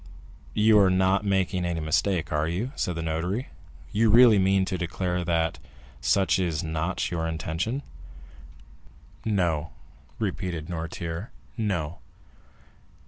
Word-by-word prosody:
"You 105 0 +5
are 95 -2 +5
not 95 +2 +2
making 95 -2 +1
any 85 -1 -1
mistake, 85 +2 0
are 75 +1 +1
you?" 95 +10 -2
said 90 - -2
the 85 - -3
notary; 85 +9 -2 0.4
"you 110 +2 +3
really 115 -1 +7
mean 95 0 +3
to 95 - -2
declare 90 +1 -2
that 80 -1 0 0.4
such 95 +8 +2
is 85 -5 -1
not 80 +4 -2
your 80 -1 -1
intention?" 80 - -2 1.4
"No," 85 -7 0 0.4
repeated 85 -4 -3
Noirtier; 85 +3 -4 0.3
"No." 90 -8 -2
90 Hz, 120 wpm, -26 LUFS, 80-100 Hz, 1.4 s, really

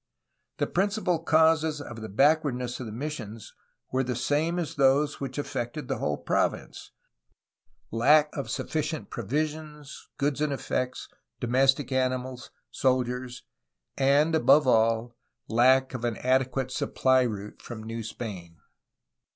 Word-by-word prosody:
The - - +1
principal 195 -2 0
causes 160 -1 +3
of 120 -5 -8
the 110 - -6
backwardness 130 0 +1
of 125 - -5
the - - -7
missions 115 -4 -6 0.4
were 130 +1 +1
the 125 -1 -2
same 150 +7 0
as 170 -4 -3
those 140 +1 +2
which 135 -1 -5
affected 145 +1 -4
the 135 -5 -2
whole 75 -1 -1
province, - - -2 0.5
— - - -65 0.3
lack 150 +7 +4
of 140 - -4
sufficient 155 -7 -3
provisions, 150 +3 -4
goods 145 0 -1
and 150 -1 +1
effects, 130 -2 -3 0.3
domestic 135 +2 +2
animals, 130 -1 -2 0.2
soldiers, 125 -1 -1 0.5
and, 140 +4 +3
above 155 -1 +5
all, 115 0 +2 0.3
lack 130 +3 +4
of 125 -2 -5
an 120 -2 -1
adequate 130 0 0
supply 130 0 +2
route 105 -4 -4
from 115 -3 -8
New 115 +1 -5
Spain. 95 -7 -7
130 Hz, 130 wpm, -27 LUFS, 120-150 Hz, 0.5 s, above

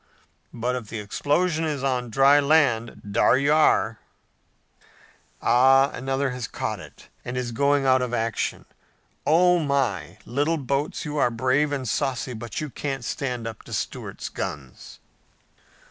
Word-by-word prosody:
But 125 +2 -2
if 120 -4 -5
the 115 - -6
explosion 155 - 0
is 150 -4 -2
on 125 -3 -1
dry 135 +5 +5
land, 140 -6 +2
dar 120 - +4
you 140 +2 +2
are!' 115 -7 +3 1.4
Ah, 135 +3 +5
another 135 +1 -1
has 125 -3 -5
caught - - -4
it, - - -14
and 125 +1 -5
is 125 -1 -2
going 140 +3 +2
out 130 -1 +4
of 125 -1 -2
action! 115 -2 -2 0.6
Oh 180 +3 +5
my, 120 - -1
little 145 +6 0
boats, 140 +3 -2
you're 150 -4 +1
brave 130 +5 +1
and 135 -3 -3
saucy, 130 0 -1
but 115 +1 -6
you 155 -3 -5
can't 135 -3 -4
stand 125 -5 -3
up 115 -1 -6
to - - -9
Stuart's - - -4
guns." 65 -3 -7
135 Hz, 145 wpm, -24 LUFS, 120-145 Hz, 1.4 s, dry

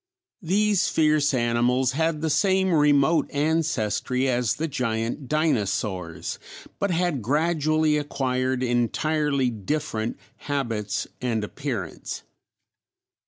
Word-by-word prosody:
These 205 +2 +2
fierce 150 -2 +3
animals 125 +1 +2
had 160 +2 0
the 160 - 0
same 190 +1 +2
remote 150 +1 +3
ancestry 140 -5 0
as 125 -3 +1
the 160 - -2
giant 120 -1 -2
dinosaurs, 105 - -1 0.4
but 200 - 0
had 175 -6 0
gradually 155 +3 +2
acquired 130 -3 -1
entirely 135 +3 +1
different 110 0 -3 0.2
habits 115 -8 -2 0.2
and 115 -4 -1
appearance. 115 - -5
140 Hz, 95 wpm, -25 LUFS, 120-155 Hz, 0.4 s, fierce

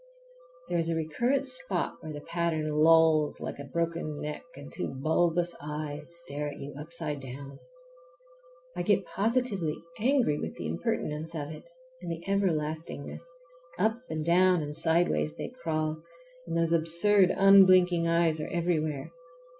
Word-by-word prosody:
There 170 - 0
is 165 0 -1
a 165 - 0
recurrent 240 - 0
spot - - -2
where 155 - -7
the 145 -1 -7
pattern 160 -2 -1
lolls 155 0 +4
like - - -6
a - - -5
broken 165 -3 -2
neck 150 0 -5
and 140 +1 -11
two - - -3
bulbous 170 +5 +1
eyes 150 +2 -4
stare 150 -3 -3
at 145 - -7
you 140 +1 -8
upside 150 0 -5
down. 135 +2 -9 1.2
I - - -2
get - - +2
positively 205 -7 0 0.2
angry 240 - +2
with - - -5
the - - -6
impertinence 150 - -3
of 150 -1 -4
it 160 - -11 0.3
and - - -5
the 165 +2 -7
everlastingness. 160 -5 -2 0.5
Up 220 +5 +1
and 155 -1 -3
down 180 0 +4
and 150 0 -6
sideways 165 -1 +1
they - - -5
crawl, 155 -10 -3 0.5
and 165 0 -2
those 165 0 +2
absurd, 170 +4 +5
unblinking 185 -3 +6
eyes 165 -2 +2
are - - -5
everywhere. 155 -4 -1
165 Hz, 145 wpm, -29 LUFS, 150-175 Hz, 1.2 s, unblinking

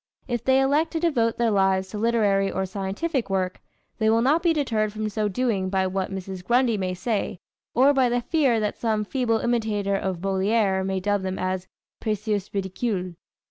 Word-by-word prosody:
If 240 -3 -2
they 265 0 +4
elect 290 +4 +2
to 325 - 0
devote 250 -9 +1
their 235 -1 +2
lives 190 -1 +2
to 210 - -5
literary 205 -4 +2
or 190 - -1
scientific 200 - -2
work, 185 -1 -1 0.4
they 220 -1 +3
will 225 +1 +3
not 300 +6 +3
be 340 -1 +3
deterred 225 -9 0
from 215 0 -3
so 215 0 -1
doing 205 -3 0
by 190 0 +1
what 190 0 -2
Mrs. 190 -1 -6
Grundy 240 +2 +2
may 185 -2 -2
say, 200 -2 -2 0.4
or 270 +4 +5
by 260 -3 +3
the 245 0 +1
fear 265 -3 +2
that 210 -1 -2
some 215 -2 0
feeble 235 -1 0
imitator 215 -4 0
of 190 -2 -2
Molière 195 +1 +1
may 190 0 -1
dub 205 +1 0
them 190 0 -3
as 185 0 -2 0.3
Précieuses 210 -2 -2
Ridicules. 190 -1 -2
210 Hz, 185 wpm, -25 LUFS, 190-240 Hz, 0.4 s, or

